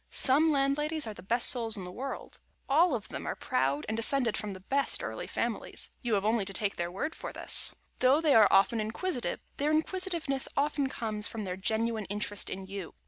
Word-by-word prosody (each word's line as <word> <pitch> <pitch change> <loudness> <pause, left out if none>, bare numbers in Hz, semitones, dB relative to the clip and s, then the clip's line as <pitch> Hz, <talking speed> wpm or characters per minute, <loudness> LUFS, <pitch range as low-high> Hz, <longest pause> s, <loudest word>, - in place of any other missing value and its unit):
Some 300 +5 +3
Landladies 295 +2 0
are 220 - -5
the - - -12
best 235 +6 +1
souls 230 -3 +2
in 190 - -6
the 180 - -7
world. 265 +8 -6 0.3
All 315 +1 +4
of 215 - -6
them - - -6
are - - -2
proud 135 +3 -1
and 220 - -2
descended 230 +1 +5
from 210 -2 -3
the 190 - -9
best 275 +9 0
early - - -5
families - - -3
(you 235 -4 0
have 200 0 -1
only 220 -1 +2
to 195 0 -5
take 200 0 -1
their 170 0 -3
word 250 - -4
for - - -7
this). - - +3 0.2
Though 260 +4 +4
they 310 -3 +3
are 215 -2 +7
often 205 +4 +4
inquisitive, 245 +6 -3 0.2
their 290 +2 0
inquisitiveness 320 -3 0
often 285 -1 +1
comes 215 -4 -1
from 220 -2 -6
their 180 -2 -4
genuine 220 +2 -1
interest 205 0 -4
in 190 0 -6
you. 195 -3 -7
230 Hz, 205 wpm, -30 LUFS, 205-280 Hz, 0.3 s, are